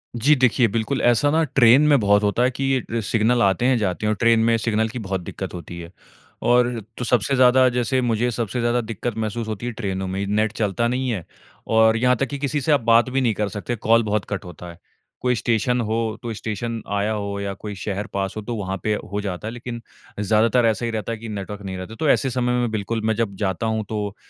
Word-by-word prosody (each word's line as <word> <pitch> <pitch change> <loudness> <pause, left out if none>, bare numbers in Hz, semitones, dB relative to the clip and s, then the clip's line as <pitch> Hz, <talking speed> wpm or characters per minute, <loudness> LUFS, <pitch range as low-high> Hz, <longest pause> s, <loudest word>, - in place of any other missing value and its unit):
जी, 135 +6 +4
देखिए 125 -2 +3
बिल्कुल 115 +5 -1
ऐसा 120 +4 +3
ना 160 +2 +3
ट्रेन 130 -3 +5
में 145 -3 +5
बहुत 105 0 +3
होता 105 +4 +2
है 125 - +2
कि 130 +2 -5
ये 115 -2 -2
सिग्नल 115 +3 +1
आते 100 +5 +2
हैं, 130 -1 +3
जाते 100 -1 -2
हैं - - +2
और - - 0
ट्रेन 115 -1 +4
में 115 0 +3
सिग्नल 110 0 0
की 120 +2 -6
बहुत 95 -3 -3
दिक्कत 95 +2 -6
होती 85 -1 -8
है। 85 0 -9 0.5
और 120 0 +4 0.3
तो 125 - -3
सबसे 125 +3 +2
ज़्यादा 130 0 +5
जैसे 125 +1 0
मुझे 120 0 +1
सबसे 115 +1 -3
ज़्यादा 120 +1 +1
दिक्कत 115 0 -5
महसूस 110 +1 -3
होती 110 +1 -5
है 120 - -2
ट्रेनों 95 -4 -3
में, 95 +2 -3
नेट 105 +1 +1
चलता 110 +2 0
नहीं 130 +1 -1
है 100 -9 -3 0.4
और 110 0 +4
यहाँ 125 +2 +3
तक 135 - 0
कि 140 - -4
किसी 145 +1 -1
से 155 - 0
आप 145 - +4
बात 115 +2 +4
भी 135 +1 0
नहीं 120 -4 +2
कर 105 0 -2
सकते 105 +4 -4
कॉल 115 +1 +3
बहुत 105 -1 -1
कट 100 -1 -4
होता 90 0 -10
है। 85 - -15 0.4
कोई 125 0 +1
स्टेशन 120 +3 0
हो, 110 0 -1
कोई 115 - -4
स्टेशन 115 +2 -4
आया 100 +2 0
हो 100 -1 -3
या 100 0 -3
कोई 105 +2 -7
शहर 100 +2 -4
पास 95 -1 -2
हो - - -3
तो 115 +3 -5
वहाँ 95 -2 -3
पे 110 - +1 0.2
हो 105 - -2
जाता 100 0 -5
है। - - -4
लेकिन 120 -1 -7 0.4
ज़्यादातर 110 +4 +3
ऐसा 115 +1 +1
ही 115 - -2
रहता 110 0 -3
है 115 - -3
कि 115 +1 -8
नेटवर्क 100 0 -6
नहीं 95 -1 -5
रहता। 95 +5 -8
तो 155 +4 0
ऐसे 135 - +3
समय 125 0 0
में 120 -1 0
बिल्कुल 110 +1 -2
मैं 110 - +2
जब 110 -3 -2
जाता 95 +1 -1
हूँ 110 -1 -1
तो 105 -2 -3
110 Hz, 245 wpm, -22 LUFS, 105-120 Hz, 0.5 s, ट्रेन